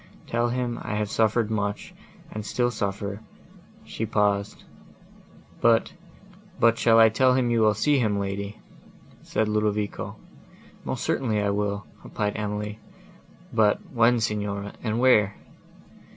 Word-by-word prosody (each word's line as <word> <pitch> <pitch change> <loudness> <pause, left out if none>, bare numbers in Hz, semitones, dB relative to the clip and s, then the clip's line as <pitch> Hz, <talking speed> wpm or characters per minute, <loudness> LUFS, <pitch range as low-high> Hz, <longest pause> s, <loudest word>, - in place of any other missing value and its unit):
Tell 120 +1 0
him 120 -1 -2
I 105 - -4
have 105 -1 -2
suffered 110 0 +1
much, 105 -1 -3 0.4
and 110 - -5
still 120 +3 0
suffer—" 100 -1 -3 0.6
She 110 - -4
paused. 105 -1 0 1.0
"But 115 -1 +3 0.9
shall 115 -1 +5
I 115 0 +8
tell 125 +3 +3
him 125 -2 +1
you 115 -1 +2
will 110 -1 +4
see 145 +6 +2
him, 105 -4 +1
lady?" 100 +1 -4 0.6
said 110 - -1
Ludovico. 105 -1 -1 0.7
"Most - - -3
certainly 110 -5 0
I 100 -1 +1
will," 100 -1 -2 0.2
replied 105 0 -2
Emily. 105 0 -4 0.7
"But 110 -2 +4
when, 120 0 +4
Signora, 105 -2 -2
and 110 -1 -1
where?" 110 -6 +4
105 Hz, 125 wpm, -25 LUFS, 105-115 Hz, 1.0 s, I